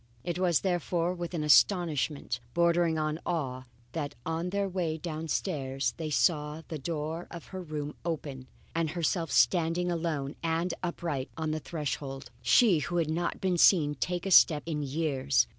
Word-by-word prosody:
It 175 0 -3
was 175 -4 +3
therefore 175 -1 0
with 175 0 -5
an 155 - -1
astonishment, 150 -5 +3 0.2
bordering 170 -1 +3
on 155 0 -1
awe, 130 -7 -2 0.3
that 145 0 -4
on 165 +2 -2
their 200 +1 0
way 175 -4 -2
downstairs, 150 -5 -2
they 160 -2 -3
saw 150 0 +1
the 160 - -4
door 160 +3 -4
of 170 -2 -9
her 185 - -4
room 150 -3 -5
open 145 -6 -4 0.3
and 165 -1 0
herself 165 +1 -1
standing 175 0 +3
alone 160 -5 -2
and 165 +2 0
upright 165 -6 -3
on 160 -1 -1
the 155 - -1
threshold 140 -5 -5
she 200 - +5
who 175 +4 -2
had 160 -2 +1
not 170 +2 -1
been 185 -2 +1
seen 155 -6 +5
to 140 - -15
take 175 +5 -2
a 195 - -2
step 155 -4 +7
in 155 -3 -2
years. 140 -2 +1
160 Hz, 165 wpm, -29 LUFS, 150-175 Hz, 0.3 s, step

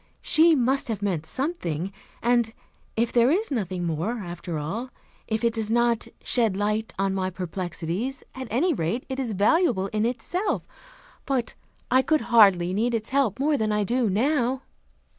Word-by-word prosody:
She 320 +1 +6
must 265 +1 +1
have 215 -3 -3
meant 170 -6 -1
something. 195 - -2 0.3
And 235 -1 +2 0.4
if 230 +1 +1
there 240 +1 +5
is 390 +7 +1
nothing 190 -8 -2
more, 170 +9 -2
after 175 -4 -5
all 200 +13 -4 0.4
if 220 +1 -2
it 235 -1 +2
does 220 -2 -3
not 235 0 +2 0.2
'shed 225 -6 +3
light 210 +2 -1
on 195 0 0
my 190 -1 -1
perplexities,' 180 +6 -4
at 260 -1 -6
any 320 +10 +2
rate, 185 - -2
it 265 0 -3
is 240 -5 -2
valuable 205 - +2
in 215 0 +1
itself. 300 - -2 0.6
But 260 -5 -1 0.4
I 260 +1 +6
could 310 +4 +1
hardly 185 -6 +6
need 235 +4 +1
its 220 +1 -3
help 265 -7 +1
more 290 +1 +2
than 215 -3 0
I 210 0 +1
do 235 +2 +1
now." 255 +4 +1
225 Hz, 165 wpm, -25 LUFS, 190-260 Hz, 0.6 s, She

